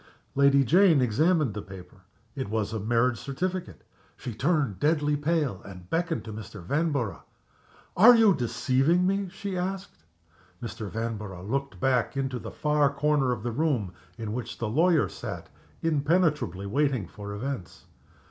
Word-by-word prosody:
_" - - -27 0.3
Lady 140 0 +5
Jane 170 - +5
examined 145 - +2
the 105 - -5
paper. 95 -1 -12 0.4
It 130 -7 -4
was 110 0 -1
a 110 - -2
marriage 115 +3 +1
certificate. 180 +6 -4 0.3
She 125 -3 -6
turned 135 - 0
deadly 150 -1 +2
pale, 145 - 0
and 90 -2 -11
beckoned 165 0 -1
to 110 - -7
Mr. 105 -1 -8
Vanborough. 140 - -1 0.7
"Are 235 +6 +9
you 220 -4 +6
deceiving 135 +6 +1
me?" 195 0 0
she 195 +1 -5
asked. 185 - -4 0.6
Mr. 110 -3 -6
Vanborough 105 -5 -5
looked 135 +7 -3
back 130 0 +1
into 135 -2 -2
the - - -7
far 150 -2 +1
corner 140 -2 +1
of 115 -4 -3
the 120 - -2
room, 120 - 0 0.2
in 110 -2 -4
which 120 -1 -5
the 115 - -2
lawyer 160 +6 +3
sat, - - -7 0.3
impenetrably 150 - +1
waiting 130 - 0
for 100 +2 -8
events. 125 -4 -6
135 Hz, 150 wpm, -27 LUFS, 110-160 Hz, 0.7 s, Are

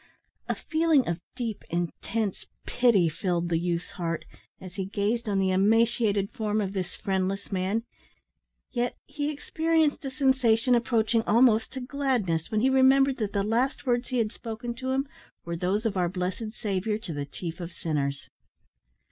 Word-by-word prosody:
A - - +1
feeling 315 -5 +2
of 170 -1 -1 0.2
deep, 230 -4 -4
intense 180 +5 -2 0.2
pity 235 -8 +4
filled 175 +1 -1
the 165 -1 +2
youth's 170 -1 -2
heart, 170 -3 -3 0.3
as 185 -1 -10
he 195 -1 -3
gazed 210 +4 -1
on 200 - +1
the 190 -1 +2
emaciated 210 0 +3
form 215 -3 -1
of 195 -2 -2
this 185 -2 -3
friendless 195 0 -2
man 195 +4 0 0.9
yet 245 -1 -1
he 290 0 -3
experienced 315 +1 +1
a 270 - -3
sensation 260 -3 +3
approaching 230 -1 +2
almost 225 -1 +4
to 265 - -4
gladness, 250 - -1
when 215 -1 +1
he 260 - +4
remembered 265 0 +5
that 215 -3 -2
the 200 - +1
last 240 +7 0
words 245 -1 +1
he 255 - -2
had 220 -3 +1
spoken 235 +1 -5
to 260 +2 -5
him 270 +2 0 0.4
were 170 0 -3
those 190 +6 -1
of 215 -3 0
our 180 -2 +1
blessed 185 +4 -3
Saviour 210 -1 -1
to 190 -6 -6
the 145 -1 -4
chief 170 +3 -6
of 175 0 -5
sinners. 145 -5 -2
215 Hz, 165 wpm, -27 LUFS, 185-250 Hz, 0.9 s, remembered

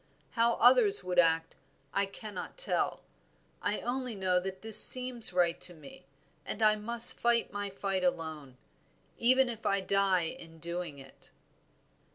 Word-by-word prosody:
How 235 0 +1
others 435 -5 +4
would 180 -1 -1
act 165 -1 +1 0.4
I 200 - 0
cannot 200 - -9
tell, - - +1 0.6
I 205 - -3
only 250 -1 -4
know 185 -2 0
that 190 +1 -8
this 220 -1 +10
seems 250 -4 0
right 175 -2 0
to 175 - -3
me; 140 -3 -15 0.4
and 220 - -5
I 215 0 +4
must 230 +2 +1
fight 235 -3 0
my 205 0 -5
fight 195 -1 -4
alone, 160 -7 -4 0.6
even 260 +2 +3
if 230 -2 -7
I 200 -1 0
die 190 -1 0
in 165 0 -9
doing 170 -2 -6
it." 135 - -16
195 Hz, 150 wpm, -29 LUFS, 175-230 Hz, 0.6 s, this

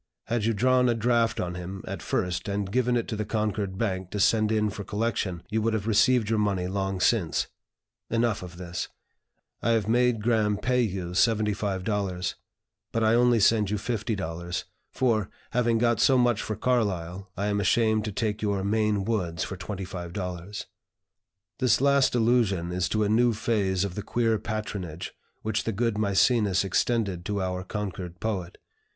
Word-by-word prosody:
Had 115 -2 -1
you 115 - +2
drawn 125 +3 +3
a 120 - +2
draft 115 0 +2
on 90 0 -2
him, 90 +2 -6
at - - -5
first, 90 +3 -1
and 100 -1 -2
given 125 0 +2
it 115 - -2
to 110 - -2
the 105 - -2
Concord 105 -2 -2
Bank 95 -4 -2
to 105 - -4
send 110 +2 +3
in 105 -1 +1
for 100 0 -6
collection, 100 -4 -2
you 110 +1 +1
would 110 0 +1
have 105 -2 -2
received 115 +1 +3
your 110 0 +1
money 100 -4 0
long 95 0 -2
since. 90 -3 +1 0.6
Enough 115 -2 +1
of 90 -1 -9
this. 85 -1 -4 0.7
I 115 - +2
have 110 -3 +1
made 120 -1 +2
Graham 110 -3 +2
pay 125 +4 +1
you 95 -6 -2
$75, 100 -2 0 0.6
but 115 - 0
I 110 +1 +4
only 120 0 +4
send 105 -1 +4
you 105 - 0
$50, 95 -6 -3 0.3
for, 110 -7 +1 0.2
having 120 -1 +2
got 120 -1 +2
so 135 - +5
much 120 -3 +3
for 110 - -3
Carlyle, 100 -6 -1
I 100 - -1
am 105 0 0
ashamed 110 +2 +2
to 105 - -3
take 105 0 -2
your 100 -2 0
'Maine 105 -1 +1
Woods' 90 -7 -1
for 95 - -5
$25." 90 0 -5 0.9
This 125 -3 +3
last 140 -1 +3
allusion 110 -7 +2
is 90 -1 0
to 110 0 +1
a - - +1
new 115 +3 +3
phase 100 -4 0
of 100 -3 -3
the 105 - -4
queer 115 +1 +1
patronage 100 -7 -5 0.3
which 110 -1 -1
the 115 - 0
good 115 +2 0
Mæcenas 105 -1 +3
extended 100 -2 0
to 105 0 -1
our 90 -1 -2
Concord 95 -3 -5
poet. 95 -5 -3
105 Hz, 170 wpm, -27 LUFS, 95-115 Hz, 0.9 s, so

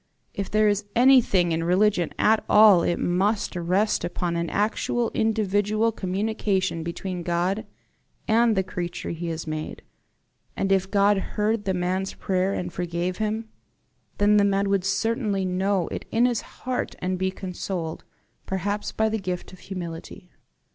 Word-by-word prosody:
If 200 -1 -4
there 215 0 +3
is 205 0 +1
anything 235 -8 +5
in 165 0 0
religion 180 0 +2
at 220 +1 +3
all 210 -4 +7
it 175 - 0
must 195 +5 0
rest 185 +5 +1
upon 175 0 -2
an 170 -1 -1
actual 220 +3 0
individual 215 0 +1
communication 195 -3 -1
between 175 +2 -4
God 175 +4 -1 0.6
and 230 -1 +3
the 190 - +3
creature 175 -2 -5
he 170 +1 -5
has 165 -1 -4
made; 155 -1 -5 0.7
and 195 - 0
if 190 -1 +2
God 200 0 +3
heard 210 +2 -1
the 190 -1 0
man's 185 +2 -1
prayer 185 0 0
and 175 -3 -4
forgave 175 +1 -2
him, 220 +1 -2 0.7
then 205 +1 +4
the 205 - +5
man 200 0 +1
would 195 -2 +1
certainly 205 -1 0
know 185 0 0
it - - -5
in 235 +2 +3
his 240 -3 +1 0.2
heart 255 -1 -2
and 185 0 -2
be 190 0 +1
consoled 180 -3 -5 0.4
perhaps 200 +2 -2
by 220 - +1
the 220 0 -1
gift 185 -2 -5
of 185 - -13
humility." 180 0 -8
195 Hz, 155 wpm, -25 LUFS, 180-210 Hz, 0.7 s, all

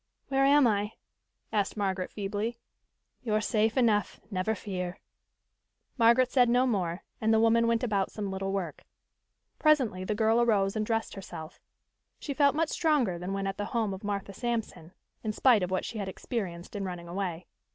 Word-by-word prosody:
"Where 270 0 +3
am 285 0 +6
I?" 210 -1 +1 0.6
asked 205 0 0
Margaret 190 -2 -1
feebly. 210 +3 -3 0.6
"You're 215 -3 +1
safe 220 +2 +1
enough, 215 -6 +2
never 195 +3 0
fear." 180 -3 -5 1.0
Margaret 240 +1 +4
said 245 -3 +4
no 250 +2 +4
more 185 -7 -1 0.2
and 220 0 +2
the 220 - +5
woman 230 +1 +4
went 230 0 +1
about 200 -5 0
some 205 -2 -4
little 195 0 -3
work. 185 -6 -4 0.8
Presently 260 - +3
the 210 +3 -1
girl 225 +2 +3
arose 200 -4 +2
and 215 - 0
dressed 225 +1 -1
herself. 175 -5 -9 0.6
She 285 - -5
felt 280 0 +3
much 325 0 +1
stronger 275 - +1
than 180 +2 -4
when 195 0 -2
at 195 0 -3
the 205 - -2
home 215 -4 0
of 190 - -8
Martha 200 -1 -3
Sampson, 225 -7 -3 0.3
in 215 -1 -2
spite 240 -2 +4
of 180 - -1
what 185 0 -1
she 225 - -5
had 200 - -3
experienced 185 -4 -5
in 200 - -2
running 175 -2 -5
away. 175 -1 -3
210 Hz, 175 wpm, -29 LUFS, 190-235 Hz, 1.0 s, am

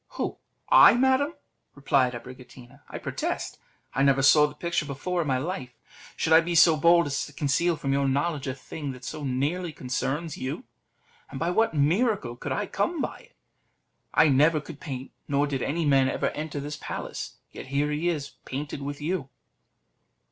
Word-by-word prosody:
"Who! - - -3 0.3
I, - - +9
madam?" 265 +5 +2 0.4
replied 135 -3 +2
Abricotina; 125 0 -12
"I - - -6
protest, - - -4 0.3
I 135 - 0
never 135 -1 +4
saw 150 +2 +7
the 150 - -11
picture 170 -1 -2
before 170 +6 -2
in 155 - -3
my 130 -2 +1
life. 130 -4 -5 0.4
Should 160 - +1
I 160 - +8
be 170 +1 -3
so 165 -1 +7
bold 170 +2 +5
as 140 -1 -2
to 150 - -14
conceal 150 +5 +1
from 135 -3 -2
your 140 0 +1
knowledge 140 +1 -1
a 130 - -2
thing 140 +1 -6
that 125 0 -13
so 150 +5 -6
nearly 145 +7 -1
concerns 140 +4 -3
you? 130 +1 -4 0.7
And 135 - -7
by 170 +2 0
what 220 -2 +2
miracle 165 - +1
could - - -6
I - - -1
come 345 -2 -1
by - - -3
it? - - -21 0.8
I 160 - +5
never 150 +3 +4
could 150 0 -10
paint, 130 -3 -6 0.2
nor 140 0 +2
did 140 -3 -3
any 165 +5 -1
man 135 -2 +4
ever - - -1
enter 150 -1 -5
this 145 +1 -5
place; - - -6 0.2
yet - - -9
here 140 +2 0
he 155 +4 0
is 145 -5 -3
painted 145 +1 -5
with 145 +1 -5
you." 155 -3 -2
145 Hz, 185 wpm, -26 LUFS, 135-170 Hz, 0.8 s, I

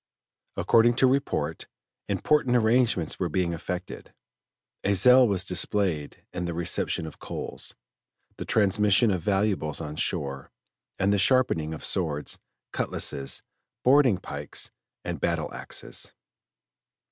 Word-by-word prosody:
According 115 +1 +4
to 130 - +4
report, 135 +2 0 0.4
important 150 -5 +2
arrangements 115 -7 +2
were 90 - 0
being 85 +1 0
effected; 90 +2 -6 0.7
a 100 +1 +2
zeal 125 +5 +7
was 95 -3 +1
displayed 90 -4 -1
in 90 0 -3
the 85 -1 -3
reception 85 -1 -1
of 80 - -10
coals, - - -6 0.6
the - - -4
transmission 105 +1 +3
of 90 -3 -1
valuables 95 -6 0
on 75 -2 -6
shore, 70 -2 -3 0.5
and 100 +1 +2
the 100 - +2
sharpening 100 -9 +2
of 80 - -6
swords, 80 -6 -2 0.3
cutlasses, 70 -1 -1 0.4
boarding 130 -5 +5
pikes, 70 -5 -5 0.3
and - - -4
battle - - -1
axes. - - -6
95 Hz, 120 wpm, -26 LUFS, 80-115 Hz, 0.7 s, zeal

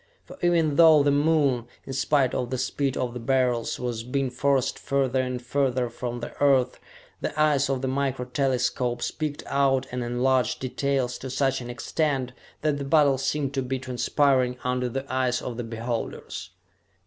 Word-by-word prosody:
For - - -11
even 165 -4 +2
though 160 -3 +7
the 145 - +3
Moon, 145 -5 +2 0.2
in 135 - -6
spite 135 -1 +2
of 125 - -2
the 130 - -2
speed 130 +1 -1
of 125 -2 -2
the 125 - -5
Beryls, 125 -1 0
was 120 -3 -3
being 130 +1 -1
forced 135 0 +1
further 135 -2 +1
and 125 -1 -3
further 125 -1 0
from 120 0 -5
the - - -6
Earth, 130 -3 +3 0.4
the - - -4
eyes 145 -3 +3
of 135 -1 -1
the - - 0
micro 130 -1 -1
telescopes 125 -1 0
picked 150 -2 -4
out 135 -2 +2
and 125 0 -3
enlarged 125 0 +1
details 130 -1 -1
to 130 - -6
such 135 0 0
an 120 - -7
extent 130 +1 -1 0.3
that 150 -2 0
the - - -3
battle 140 -2 +4
seemed 140 0 -1
to 135 - 0
be 130 +1 -2
transpiring 130 0 +1
under 125 0 0
the 135 +3 -4
eyes 130 -2 0
of 120 -2 -6
the 120 - -3
beholders. 115 -6 -5
130 Hz, 175 wpm, -26 LUFS, 125-140 Hz, 0.4 s, though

